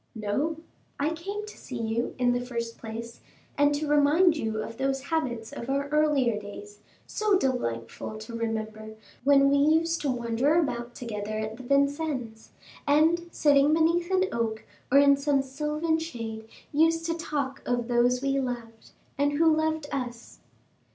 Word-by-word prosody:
"No; 250 +10 -1 0.4
I 295 +3 +1
came 395 +6 -5
to 425 - -11
see 250 - -7
you, 230 +1 -2
in 245 -1 +3
the 245 0 0
first 235 -2 -4
place, 230 +1 -7 0.3
and 290 0 +4
to 300 +1 -2
remind 295 +4 +4
you 220 -6 -2
of 230 - -8
those 270 0 0
habits 240 -9 -1
of 235 - -6
our 280 +1 0
earlier 290 -7 +2
days, 205 0 -10 0.3
so 425 -2 +1
delightful 215 - -3
to 220 +2 -8
remember, 220 -1 -4 0.3
when 275 0 +5
we 280 - +4
used 320 +3 +3
to 290 - -1
wander 245 +4 +1
about 240 -7 -1
together 215 -3 -4
at 215 0 -3
Vincennes, 275 -3 -1 0.4
and, 325 +4 +3
sitting 290 0 +4
beneath 335 +2 +2
an 375 0 +3
oak, 225 -2 -2 0.3
or 275 - +6
in 280 0 +6
some 280 -1 +1
sylvan 300 +4 -1
shade, 230 -8 -6 0.3
used 325 +2 +3
to 330 - 0
talk 285 -4 -3
of 245 -1 0
those 245 +1 +2
we 275 0 +1
loved, 235 -3 -5 0.3
and 285 0 +2
who 320 +1 +4
loved 315 -1 0
us." 245 -3 -5
275 Hz, 160 wpm, -27 LUFS, 230-305 Hz, 0.4 s, or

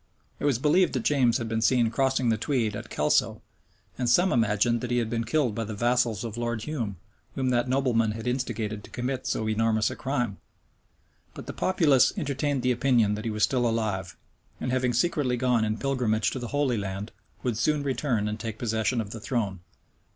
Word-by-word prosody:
It - - -3
was 140 -5 +3
believed 155 +8 +3
that 130 -4 -1
James 130 -5 +3
had 115 -3 -4
been 110 0 -1
seen 120 -1 +3
crossing 130 -1 +1
the 110 - +2
Tweed 115 -5 0
at 105 - -7
Kelso;* - - +1 0.6
and 125 -2 +1
some 175 +10 +4
imagined 115 +1 +2
that 125 - -4
he 120 - +1
had 115 -2 -1
been 115 -1 -1
killed 125 -1 +1
by 115 - -2
the 110 0 -5
vassals 120 -1 +1
of 115 -1 -5
Lord 120 -2 -2
Hume, 115 -9 -3 0.4
whom 130 -1 0
that 120 0 +1
nobleman 120 -5 +2
had 110 0 -7
instigated 115 -4 -2
to - - -13
commit 130 +1 -3
so 110 - -1
enormous 110 0 +1
a - - -5
crime. 125 -8 -2 1.0
But - - -8
the - - -6
populace 155 -8 +3
entertained 145 -4 -1
the 125 - +3
opinion 120 -4 +2
that 105 +1 -5
he - - 0
was 105 0 -1
still 125 -3 +2
alive, 105 -5 -2 0.4
and 125 - -2
having 130 -1 +1
secretly 130 -1 +1
gone 125 -2 +2
in 110 0 -1
pilgrimage 125 -6 0
to 130 - -4
the 120 - -5
Holy 135 -4 0
Land, 100 +2 -5 0.3
would 125 -3 0
soon 150 +4 +1
return 130 -6 0
and 105 +1 -3
take 110 -1 -5
possession 115 +1 0
of 105 -2 -7
the 115 - -6
throne. 105 -5 -2
120 Hz, 200 wpm, -27 LUFS, 110-130 Hz, 1.0 s, some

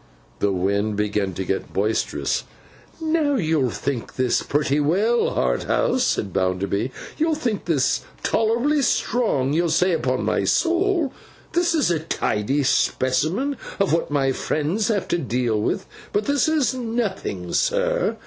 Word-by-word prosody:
The 100 - +2
wind 100 +3 0
began 105 -2 -1
to 95 - -3
get 95 - -3
boisterous. 105 +3 0 0.5
'Now, 315 -3 +1
you'll 155 - +1
think 125 +1 -4
this 130 -2 +1
pretty 145 0 0
well, 200 +11 +2
Harthouse,' 255 +1 +1
said 105 - 0
Mr. - - -16
Bounderby. 95 +5 0 0.3
'You'll 320 0 +2
think 235 -9 -2
this 150 -6 +1 0.2
tolerably 240 +7 +2
strong. 215 - +1
You'll 170 +2 +2
say, 180 +4 +3
upon 165 - 0
my - - +1
soul 345 -4 +1 0.4
this 345 -1 +2
is 295 - +2
a 165 - +1
tidy 140 -3 -1
specimen 150 - +1 0.2
of 195 -4 +2
what 165 - +1
my 140 -2 +1
friends 155 - -1
have 210 -5 0
to 175 - +1
deal 120 -4 0
with; 190 - -1 0.3
but 205 +1 +1
this 285 -1 +2
is 290 -7 +2
nothing, 220 - -3
sir! - - +1
165 Hz, 145 wpm, -23 LUFS, -, 0.5 s, say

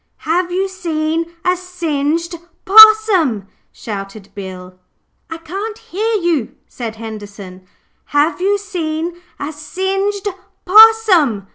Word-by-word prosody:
'Have 350 +2 -2
you 380 +2 -1
seen 330 -3 -3
a 360 0 +2
singed 335 -2 -3 0.3
possum?' 405 - +6 0.3
shouted 200 -1 -8
Bill. 185 -2 -10 0.5
'I 330 - -6
can't 390 +7 -6
hear 440 +4 -3
you,' 340 - -1
said 230 -3 -7
Henderson. 205 -4 -10 0.4
'Have 295 +5 0
you 400 +2 +1
seen 345 -3 -5 0.2
a 290 +2 -5
SINGED 390 +6 -3 0.4
POSSUM?' 375 - +5
335 Hz, 105 wpm, -16 LUFS, 235-385 Hz, 0.5 s, possum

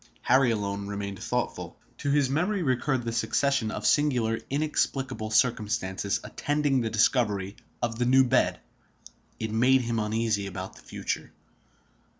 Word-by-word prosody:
Harry 130 0 +4
alone 100 -2 -2
remained 100 -1 -5
thoughtful. - - -3 0.2
To 140 - -2
his 140 -1 +3
memory 180 +8 0
recurred 130 -1 0
the 115 - -1
succession 115 +1 +1
of - - -5
singular, 125 -7 +2
inexplicable 135 -5 -1
circumstances 105 -4 0
attending 145 -3 0
the 115 - -1
discovery 105 -3 +1 0.3
of 115 -1 -2
the 120 - +2
new 130 +2 +6
bed. 130 0 +2 0.8
It 110 -1 -3
made 125 +4 +4
him 115 -2 -1
uneasy 105 -1 0
about 95 0 -7
the - - -15
future. - - -4
115 Hz, 140 wpm, -27 LUFS, 105-135 Hz, 0.8 s, new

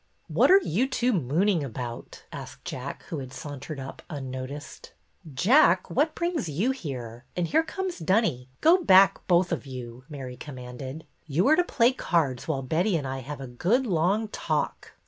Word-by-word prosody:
"What - - +3
are 380 - +9
you 250 - 0
two 250 -1 +1
mooning 170 - +1
about?" 120 -2 -7
asked - - -9
Jack, 130 +2 -6
who 160 - -5
had 130 -2 -7
sauntered 145 +1 -7
up 135 0 -8
unnoticed. 135 0 -7 0.4
"Jack, 185 - +4
what 300 +5 +1
brings 340 - -1
you 190 - +1
here? 125 - -6
And 175 - +1
here 310 - +3
comes 370 +3 -4
Dunny. 165 - +1
Go 350 +3 +5
back, 190 - +6
both 175 0 +3
of - - -3
you! 125 -1 -8
" - - -33
Mary 130 -4 -7
commanded. 130 +2 -8
" - - -41
You 160 +6 +1
are 310 - +7
to 355 - +3
play 245 -7 +3
cards 155 - 0
while 140 -4 -1
Betty 170 +8 +1
and 145 - -4
I 135 0 -3
have 140 +3 -7
a - - -5
good 180 - +1
long 195 +3 +1
talk." - - -2
160 Hz, 180 wpm, -27 LUFS, 130-215 Hz, 0.4 s, are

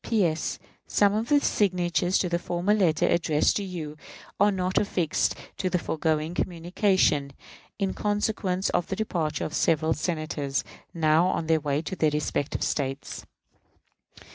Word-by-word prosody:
P.S. 175 -8 0 0.3
Some 205 -1 +3
of 220 +3 -1
the 290 -1 +5
signatures 180 -4 +1
to 185 - 0
the 170 0 0
former 175 +3 0
letter 180 -7 +2
addressed 155 -3 +2
to 205 - -2
you 160 -6 -6 0.4
are 205 +1 +5
not 185 -1 0
affixed 175 -6 0 0.2
to 185 - -1
the 180 - +1
foregoing 160 -1 -1
communication, 175 -5 +1 0.4
in 195 -2 -1
consequence 205 -3 -1
of 175 - 0
the - - -2
departure 165 -9 -2
of 155 - -5
several 160 0 +2
Senators, 155 -4 -2 0.3
now 165 0 +3
on 170 -3 -1
their 160 0 +3
way 145 0 -1
to 180 - -4
their 155 -4 +2
respective 150 -1 -2
States. 135 -1 -3
175 Hz, 145 wpm, -26 LUFS, 155-190 Hz, 0.4 s, the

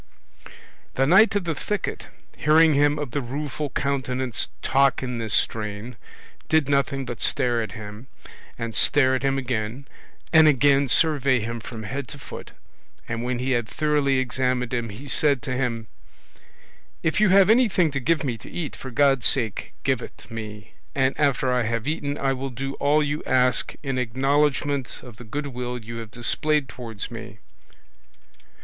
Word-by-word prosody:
The 135 - +3
Knight 195 +8 +6
of 205 - +1
the 170 -2 -1
Thicket, 210 +6 -4 0.3
hearing 155 +1 +5
him 145 +1 +3
of 145 -4 -4
the 145 - -1
Rueful 145 +3 -4
Countenance 130 -3 -2
talk 135 0 +3
in 125 -2 -3
this 110 -2 -4
strain, 105 +2 -2 0.5
did 155 -3 +3
nothing 140 -1 +1
but 120 -3 -6
stare 120 -2 +1
at 110 -4 -5
him, 105 +3 -9 0.5
and 115 -1 -4
stare 130 +1 +4
at 130 - 0
him 135 0 +1
again, 125 +1 -3 0.5
and 160 -1 +8
again 140 0 +4
survey 140 -2 +3
him 115 +1 -4
from 110 0 -8
head 135 +4 -4
to - - -9
foot; - - -10 0.5
and 115 0 -3
when 125 0 -1
he 130 +2 -2
had 120 -3 +1
thoroughly 150 -3 +1
examined 125 -1 -1
him, 120 -2 -1
he 115 +8 -9
said 140 -1 +3
to 130 - -3
him: 120 -3 -2 1.2
"If 160 +5 +1
you 215 - +5
have 195 +2 +6
anything 215 -9 +3
to 140 - -2
give 155 +5 +1
me 120 -5 -2
to - - -12
eat, 165 -5 -5
for 130 - -8
God's 135 0 +3
sake 115 -7 -2
give - - +1
it - - -10
me, 105 -2 -8 0.2
and 130 -1 +2
after 135 -3 +2
I 125 - +2
have 115 +1 -2
eaten 145 -2 -2
I 135 -1 +1
will 135 +1 -4
do 135 +2 -5
all 150 +2 +3
you 145 +1 -2
ask 125 -1 +2
in 135 -2 -1
acknowledgment 135 +2 0
of 120 -4 -12
the 125 - -10
goodwill 125 -1 -4
you 115 0 -8
have 115 -2 -7
displayed 150 +5 0
towards 115 -5 -7
me." - - -8
130 Hz, 170 wpm, -24 LUFS, 120-145 Hz, 1.2 s, and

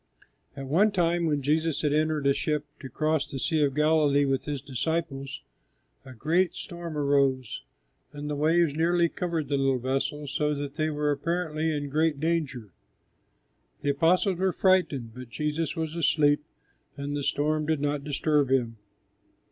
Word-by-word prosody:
At 135 - -5
one 185 +11 +3
time 170 -2 +1
when 145 -3 0
Jesus 155 +2 +1
had 145 -1 +2
entered 155 -1 +1
a 140 - +5
ship 150 +1 -1
to 135 - -8
cross 155 +3 0
the 135 - -5
Sea 155 +3 0
of 140 -2 0
Galilee 150 -2 +3
with 135 -1 -1
His 145 -2 -3
disciples, 140 +1 -3 0.6
a 130 - -11
great 170 +8 +1
storm 170 -3 -6
arose 140 -3 +1 0.5
and 145 0 -7
the 150 - -2
waves 160 +1 +2
nearly 170 +1 +2
covered 165 -4 -3
the 140 0 0
little 135 -1 +2
vessel, 135 +4 -2
so 150 +1 0
that 140 -1 -5
they 155 0 0
were 150 -1 0
apparently 160 +1 -1
in 145 -2 -2
great 155 0 +1
danger. 140 - -2 1.1
The 145 - +2
disciples 180 +5 +2
were 190 0 +2
frightened, 175 - +1
but 125 0 -10
Jesus 150 +5 -2
was 160 -2 -3
asleep 150 -3 +3 0.5
and 140 +1 -4
the 145 - -2
storm 150 +2 0
did 160 -2 +1
not 145 0 -1
disturb 145 -1 +1
Him. 120 -4 +1
150 Hz, 165 wpm, -27 LUFS, 140-160 Hz, 1.1 s, a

